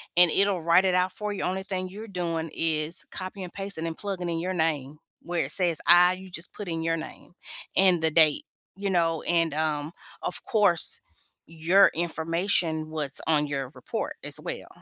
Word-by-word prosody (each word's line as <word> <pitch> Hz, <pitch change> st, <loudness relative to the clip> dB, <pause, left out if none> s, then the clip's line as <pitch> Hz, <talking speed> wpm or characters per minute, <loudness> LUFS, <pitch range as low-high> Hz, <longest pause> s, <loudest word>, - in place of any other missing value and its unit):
and 175 Hz, 0 st, +7 dB
it'll 195 Hz, -2 st, +2 dB
write 170 Hz, +3 st, +4 dB
it 185 Hz, -, +2 dB
out 180 Hz, 0 st, +2 dB
for 210 Hz, +1 st, -4 dB
you. -, -, -4 dB
Only 190 Hz, +1 st, -2 dB
thing 185 Hz, -1 st, -4 dB
you're 210 Hz, +4 st, -9 dB
doing 170 Hz, -4 st, -3 dB
is 160 Hz, +1 st, -1 dB
copy 185 Hz, +1 st, -7 dB
and 180 Hz, -, -8 dB
pasting 195 Hz, -4 st, -4 dB
and 165 Hz, -, -5 dB
plugging 190 Hz, -4 st, -4 dB
in 165 Hz, -1 st, -2 dB
your 185 Hz, +3 st, -2 dB
name. 155 Hz, -4 st, -1 dB, 0.2 s
Where 170 Hz, -4 st, -1 dB
it 135 Hz, -, -4 dB
says 175 Hz, -2 st, +2 dB
I, 175 Hz, +1 st, +7 dB
you 190 Hz, +1 st, -10 dB
just 175 Hz, -1 st, -9 dB
put 205 Hz, -, -7 dB
in 165 Hz, -1 st, -3 dB
your 165 Hz, 0 st, 0 dB
name 160 Hz, +2 st, -10 dB, 0.4 s
and 185 Hz, -3 st, +4 dB
the 160 Hz, -1 st, +1 dB
date, 155 Hz, -2 st, +4 dB, 0.3 s
you 200 Hz, +1 st, -3 dB
know. 165 Hz, -3 st, +1 dB
And 165 Hz, -3 st, +2 dB
um, 150 Hz, -1 st, -1 dB, 0.3 s
of -, -, -3 dB
course, 200 Hz, -7 st, +2 dB, 0.4 s
your 165 Hz, +5 st, +4 dB
information, 165 Hz, -1 st, -1 dB
what's 150 Hz, -3 st, -1 dB
on 150 Hz, -2 st, +2 dB
your 135 Hz, -2 st, -3 dB
report -, -, -5 dB
as -, -, -1 dB
well. -, -, -6 dB
170 Hz, 190 wpm, -26 LUFS, 160-185 Hz, 0.4 s, and